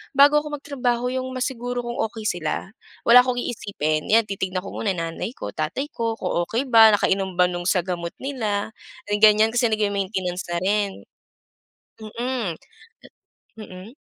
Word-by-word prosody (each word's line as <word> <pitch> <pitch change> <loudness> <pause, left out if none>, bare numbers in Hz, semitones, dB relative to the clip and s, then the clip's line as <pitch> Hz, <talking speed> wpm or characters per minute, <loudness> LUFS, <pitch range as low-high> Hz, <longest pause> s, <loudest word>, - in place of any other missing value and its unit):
bago 290 +2 +6
ako 300 -1 -5
magtrabaho 250 -3 -1
yung 260 0 -3
masiguro 245 -1 -3
kung 240 0 -5
okey 220 -1 -9
sila. 175 +1 -3 0.4
Wala 245 +1 +9
akong 250 -1 -1
iisipin, 155 -9 -2
'yan 230 +1 +6
titignan 190 -2 -3
ko - - -8
muna 205 - -1
nanay 165 +8 -4
ko 100 - -6
tatay 175 - -3
ko 230 -3 -2
kung 175 -2 -1
okey 235 +4 -1
ba 225 -3 +7
nakainom 190 -2 0
ba 180 - +4
no'ng 175 0 -4
sa 180 -2 +2
gamot 170 -2 -4
nila 220 -7 -2 0.5
ganyan 215 +1 +6
kasi 240 0 +2
nag-ma-maintainance 195 -3 -1
na 175 - 0
rin. 205 +1 +1 1.1
Mm. 230 -3 -3 1.1
Mm. 190 0 -10
215 Hz, 150 wpm, -23 LUFS, 185-245 Hz, 1.1 s, Wala